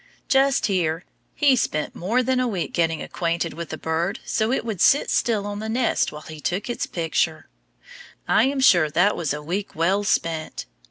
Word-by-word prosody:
Just 270 0 +3
hear! 175 -4 0 0.3
He 285 -3 +4
spent 150 -10 -1
more 230 +9 0
than 255 0 +1
a 255 - +1
week 190 -7 -3
getting 165 -2 0
acquainted 170 -1 -2
with 170 +1 -7
the 155 - -5
bird 165 +6 -2
so 220 +1 0
it 260 - -1
would 210 -6 -4
sit 280 - +4
still 215 -4 +1
on 205 0 -4
the 220 +1 -5
nest 235 +1 +1
while 150 - -9
he 155 -1 -10
took 195 +9 -2
its - - -3
picture. 165 -1 -1 0.8
I 220 - +4
am 270 0 0
sure 175 - +5
that 180 +7 +2
was 165 -4 -2
a 150 +1 -4
week 190 +6 -4
well 185 +5 +1
spent. 165 -5 -1
185 Hz, 195 wpm, -23 LUFS, 165-225 Hz, 0.8 s, sure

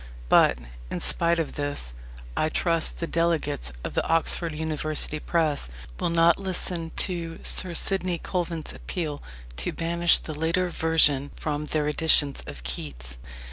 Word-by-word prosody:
But, 65 - +5 0.3
in - - -4
spite 170 0 0
of 165 -2 -2
this, 145 - -4 0.4
I 155 - +1
trust 165 0 0
the 170 - -3
Delegates 165 - -1
of - - -5
the - - 0
Oxford 165 +1 +2
University 155 -1 -3
Press 155 - -1 0.3
will - - 0
not 170 +1 +4
listen 180 -3 -2
to 170 -3 -2
Sir 180 -2 +3
Sidney 185 -2 +4
Colvin's 170 -3 -4
appeal 155 -5 -5 0.4
to 60 - -2
banish 170 +1 +4
the 155 - -7
later 165 +4 0
version 150 -4 +3
from 150 -1 -4
their 150 -1 -1
editions 150 -2 +4
of 70 -4 -9
Keats. - - -4
160 Hz, 140 wpm, -25 LUFS, 145-170 Hz, 0.4 s, But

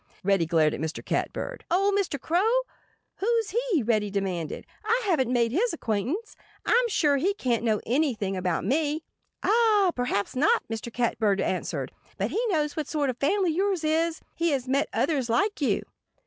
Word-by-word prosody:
Reddy 190 -4 +2
glared 160 -2 +3
at - - -4
Mr. 160 +1 -4
Catbird. - - -3
"Old 390 +3 +2
Mr. 385 -8 0
Crow? 420 - +2 0.6
Who's 455 0 0
he?" 455 - +1
Reddy 215 -2 +1
demanded. 190 -5 -3 0.2
"I 445 +3 +2
haven't 280 - +1
made 235 -2 +2
his 420 - +1
acquaintance. 270 - -2 0.3
I'm 485 0 +3
sure 295 -10 +2
he 385 +8 +1
can't 240 - 0
know 215 -3 +1
anything 235 -7 0
about 180 -2 -1
me." 305 +2 0 0.4
"Ah! 425 -4 +4
Perhaps 245 -4 -1
not!" 290 +5 +3
Mr. 225 +1 -5
Catbird 220 -4 +1
answered. 185 - -2 0.3
"But - - -1
he 460 - 0
knows 305 -7 0
what 310 -3 -3
sort 290 -4 0
of 245 - -12
family 365 +6 +2
yours 375 0 0
is. 320 +1 +1
He 335 0 0
has 270 -4 -1
met 275 +2 +1
others 275 -7 0
like 405 - +1
you." 280 - +1
290 Hz, 170 wpm, -26 LUFS, -, 0.6 s, Ah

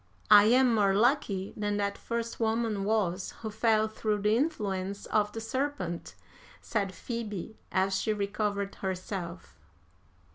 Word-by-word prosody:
"'I 205 -1 +10
am 250 +2 +5
more 200 -3 +3
lucky 210 -5 +1
than 205 -1 -1
that 200 0 -1
first 235 0 -4
woman 220 -3 0
was 200 -4 0
who 220 - -3
fell 220 0 +2
through 215 -1 -2
the 210 +1 +4
influence 200 - -1
of 210 -1 +1
the 225 - -5
serpent,' 260 -7 -3 0.4
said 200 -4 -2
Phoebe, 220 -1 -5
as 190 0 +1
she 220 - 0
recovered 200 -1 -1
herself. 180 - -5
210 Hz, 135 wpm, -29 LUFS, 195-225 Hz, 0.4 s, I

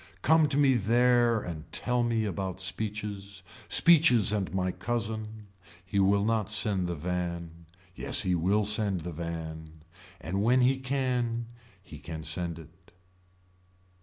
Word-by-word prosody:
Come 160 -1 +4
to 140 -1 -2
me 140 -2 +4
there 120 +1 +3
and 80 -4 -8
tell 125 0 0
me 115 -2 0
about 95 -2 -4
speeches. 100 -1 -5 0.3
Speeches 145 - +5
and 100 -3 -2
my 95 -1 -1
cousin. 110 -1 -4 0.4
He 100 +2 -1
will 100 +1 +3
not 110 -2 0
send 100 -4 +1
the 85 - -3
van. 85 0 -5 0.3
Yes - - +1
he 90 - 0
will 95 +5 +1
send 105 -4 +1
the 85 +2 -6
van. 80 -1 -7 0.4
And 95 +2 -3
when 125 +4 +3
he 130 +2 +2
can. 125 -3 -2 0.3
He 75 -6 -12
can 80 +1 -7
send 85 0 -2
it. 85 +3 -16
100 Hz, 140 wpm, -28 LUFS, 90-120 Hz, 0.4 s, Speeches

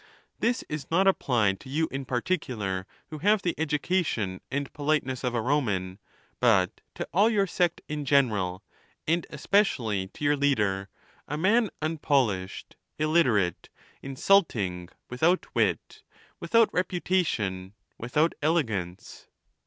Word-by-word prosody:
This 240 +2 0
is 150 -2 -5
not 185 +4 +3
applied 120 - +2
to 130 - -13
you 160 +4 0
in 135 0 -4
particular 120 - -2 0.2
who 155 - -6
have 205 +4 +3
the 175 - 0
education 150 - -1
and 140 +1 -3
politeness 145 -3 -1
of 125 -1 -1
a 115 - +1
Roman, 105 -9 -1 0.4
but - - +2
to - - -4
all 205 +5 +5
your 205 -3 +2
sect 175 -2 0
in 150 -1 -4
general, 110 -10 +1 0.4
and 170 +2 +1
especially 130 - +1
to 105 - -11
your 145 0 +3
leader' 105 -9 0 0.2
— - - -32
a 150 - -3
man 210 +6 +3
unpolished, 135 - -1 0.2
illiterate, 150 - +1 0.3
insulting, 120 - +1 0.2
with 125 0 -9
out 175 +3 +3
wit, - - -1 0.4
without 230 -1 +3
reputation, 155 - -1 0.3
without 150 +8 +1
elegance. 110 - -2
140 Hz, 130 wpm, -27 LUFS, 105-170 Hz, 0.4 s, all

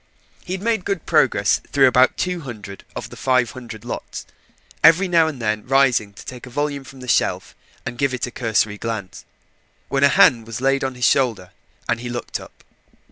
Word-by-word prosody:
He 180 - -5
had 190 +1 -5
made 225 -4 0
good 195 -4 -3
progress 135 -11 +3
through 140 -1 +5
about 130 0 +4
two 180 -1 -1
hundred 105 -9 -9
of - - -6
the - - -9
five 125 -3 +1
hundred 115 -4 -10
lots - - -6 0.6
every 165 +4 +6
now 165 -3 +4
and 150 -5 -5
then 105 -2 -1
rising 130 -6 +3
to - - -13
take 125 0 -9
a - - -9
volume 145 +1 -2
from 135 0 -13
the 125 - -9
shelf - - 0 0.3
and 120 - -6
give 140 -1 +2
it 125 - -2
a 125 - -8
cursory 110 -4 0
glance 105 -5 -5 0.6
when 140 0 +1
a 140 - +7
hand 115 -4 +4
was 115 0 -5
laid 135 +1 +1
on 130 -1 -2
his 125 -1 0
shoulder, 115 -10 +1 0.4
and 115 -1 0
he 120 0 -6
looked 120 -1 -4
up. - - -15
125 Hz, 200 wpm, -21 LUFS, 115-140 Hz, 0.6 s, a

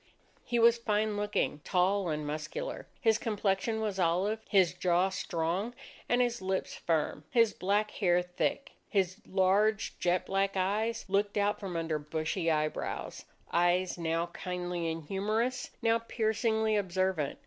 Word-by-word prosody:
He 240 - -1
was 235 0 +5
fine 215 -1 0
looking, 205 -7 -1
tall, 190 0 +1
and 150 -1 -2
muscular. 155 - -4
His 225 -1 +3
complexion 210 0 0
was 210 -3 -2
olive, 185 +5 +1
his 190 -4 +4
jaw 180 +1 +2
strong, 185 +5 -2 0.3
and 245 +1 +4
his 240 -2 -2
lips 190 0 -2
firm, 160 -2 -1
his 230 -3 +4
black 205 +3 0
hair 180 -3 +2
thick. 180 +9 -2 0.2
His 190 -2 +1
large, 200 +3 +2
jet 175 0 +1
black 195 0 0
eyes 215 +5 0
looked 200 +2 +1
out 205 0 +1
from 190 -4 -5
under 160 -2 -1
bushy 155 +3 -2
eyebrows; 155 -1 -2 0.3
eyes 175 +1 +2
now 165 0 0
kindly 180 -2 -3
and 160 0 -5
humorous, 215 +9 -1
now 230 0 +3
piercingly 220 -1 0
observant. 185 -6 0
195 Hz, 140 wpm, -31 LUFS, 175-215 Hz, 0.3 s, was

